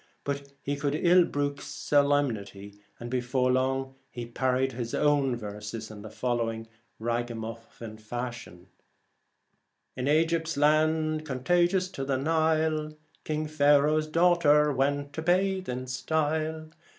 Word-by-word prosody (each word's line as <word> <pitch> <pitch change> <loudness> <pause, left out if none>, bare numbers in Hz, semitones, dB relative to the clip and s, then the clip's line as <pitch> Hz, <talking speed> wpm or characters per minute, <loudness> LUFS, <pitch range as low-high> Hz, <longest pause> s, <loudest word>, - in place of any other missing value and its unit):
But 140 0 -4
he 145 - -1
could 140 0 -1
ill 175 +2 +5
brook 145 -1 -2
so 145 -1 +1
lemnity, 105 -8 -2 0.2
and 120 - -6
before 125 0 +1
long 135 +1 0 0.4
parodied 130 +1 +1
his 120 -1 -4
own 145 -4 +2
verses 105 0 -7
in 105 -1 -10
the 110 - -9
following 115 -1 -2 0.3
ragamuffin 115 -1 -5
fashion: 120 -5 -6 1.3
In 130 +1 -3
Egypt's 160 +1 +1
land, 155 +1 +2
contagious 175 +7 +1
to 140 -7 -5
the 135 -1 0
Nile, 155 +1 +1 0.3
King 155 0 -2
Pharaoh's 150 +1 +3
daughter 155 -3 +4
went 140 +2 -1
to 160 - -4
bathe 185 +2 +1
in 125 +1 -3
style. 155 +4 -2
140 Hz, 120 wpm, -28 LUFS, 120-155 Hz, 1.3 s, ill